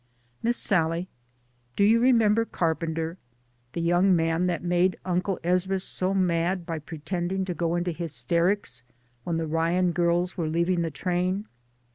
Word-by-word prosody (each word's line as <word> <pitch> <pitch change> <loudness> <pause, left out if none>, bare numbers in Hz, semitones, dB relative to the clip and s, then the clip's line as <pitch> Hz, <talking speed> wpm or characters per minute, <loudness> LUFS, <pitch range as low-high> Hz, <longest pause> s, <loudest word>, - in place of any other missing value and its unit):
Miss 240 +1 +1
Sallie, 170 -1 +1 0.7
do - - +2
you 220 +3 +5
remember 230 -3 +4
Carpenter? 165 -3 -2 0.5
the 170 - -2
young 175 +3 +4
man 165 +2 +1
that 175 -2 -2
made 180 +1 +2
Uncle 180 +1 -1
Ezra 185 +2 +1
so 185 0 -3
mad 175 -1 +1
by 165 -1 -3
pretending 175 +5 -3
to 180 - -3
go 170 0 -1
into 175 0 -1
hysterics 170 +2 -1 0.4
when 170 -2 -1
the 165 - -1
Ryan 165 +3 +1
girls 175 +1 +1
were 165 -3 -2
leaving 170 +2 +1
the 165 - -1
train? 180 +6 -1
175 Hz, 145 wpm, -26 LUFS, 165-185 Hz, 0.7 s, you